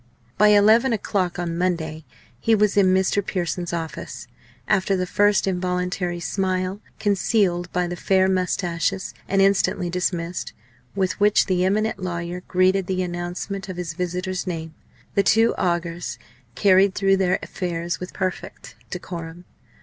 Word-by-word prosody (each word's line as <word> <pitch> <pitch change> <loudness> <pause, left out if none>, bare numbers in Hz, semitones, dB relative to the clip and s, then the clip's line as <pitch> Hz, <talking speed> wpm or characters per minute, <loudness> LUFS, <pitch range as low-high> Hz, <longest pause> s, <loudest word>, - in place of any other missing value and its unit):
By 210 - +5
eleven 215 +4 +5
o'clock 190 -4 -1
on 170 -1 -3
Monday 160 -3 -2 0.3
he 225 -1 +3
was 210 -1 +2
in 195 -2 +5
Mr. 190 +2 +2
Pearson's 175 -2 -2
office. 165 -2 -5 0.4
After 195 -1 +2
the 185 - 0
first 205 +2 +3
involuntary 180 -1 -1
smile, 185 +2 -1 0.2
concealed 195 -3 +1
by 180 0 0
the 175 0 -4
fair 190 +1 +2
moustaches, 185 0 -1
and 195 0 +3
instantly 195 -2 +2
dismissed, 180 -1 -2 0.4
with 190 -3 -1
which 210 +1 +4
the 180 -2 +1
eminent 215 +2 0
lawyer 175 -1 -4
greeted 185 0 +2
the 185 -1 0
announcement 180 +3 -4
of 185 - -6
his 175 -2 -4
visitor's 180 +2 -3
name, 160 -2 -4 0.4
the 200 - +4
two 225 +4 +4
augurs 170 -1 -2 0.4
carried 195 -1 +4
through 195 -1 +3
their 190 -1 +2
affairs 175 -1 -3
with 180 - -6
perfect 185 -2 -5
decorum. 175 -1 -7
185 Hz, 140 wpm, -23 LUFS, 175-195 Hz, 0.4 s, By